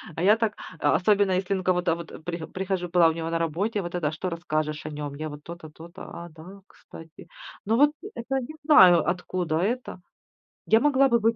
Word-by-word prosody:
А 165 - -4
я 210 +4 +5
так, 225 -2 0 0.3
а, - - +2
особенно 200 0 +3
если, 185 +1 0
ну, 190 - -3
кого-то 180 -2 +1
вот 170 -1 -10
при 170 -1 -5
прихожу 185 -1 -3
Была 175 -1 +5
у - - -1
него 165 0 -4
на 165 - 0
работе, 195 +7 -1
вот 175 -1 -6
это: 155 -4 -1
"Что 160 +4 -4
расскажешь 155 -3 -3
о - - -4
нём?" 145 -1 -6
Я 155 +2 -5
вот: 150 0 -10
"То-то, 170 -2 -9
то-то",- 170 +4 -13
"А, 170 0 -8
да, 175 +5 -13
кстати". 160 0 -14 0.4
Ну 225 +3 +1
вот 290 +2 +5 0.2
это, 265 +3 -2
не 285 +5 -8
знаю, 185 - +7
откуда 180 -2 -2
это. 225 +1 -2 0.7
Я 220 - +4
могла 275 0 +3
бы 235 -1 +3
быть 225 +1 +2
180 Hz, 210 wpm, -25 LUFS, 165-210 Hz, 0.7 s, знаю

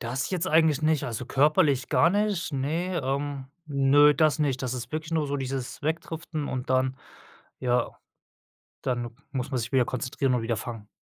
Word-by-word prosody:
Das 125 +3 -2
jetzt 185 -2 -1
eigentlich 160 -3 +3
nicht, 155 -1 +2
also, 125 +1 -4
körperlich 145 -1 +3
gar 165 - +4
nicht, 205 -4 0
ne, 165 +7 -1
ähm. 140 0 -2 0.2
Ne, 145 +1 +5
das 155 -1 +3
nicht. 140 -3 0
Das 130 0 -2
ist 120 -1 -6
wirklich 155 +1 -4
nur 160 -2 +1
so 145 0 -2
dieses 135 -2 -4
Wegdriften 160 0 -3
und 130 -1 -4
dann 130 0 +2 0.6
ja, 125 -1 +1 0.9
dann 120 -2 -2 0.2
muss 130 -1 -3
man 130 - -1
sich 115 +1 -4
wieder 130 -2 +4
konzentrieren 130 +2 -1
und 120 - 0
wieder 115 0 -1
fangen. 110 -1 -6
140 Hz, 175 wpm, -27 LUFS, 125-155 Hz, 0.9 s, Ne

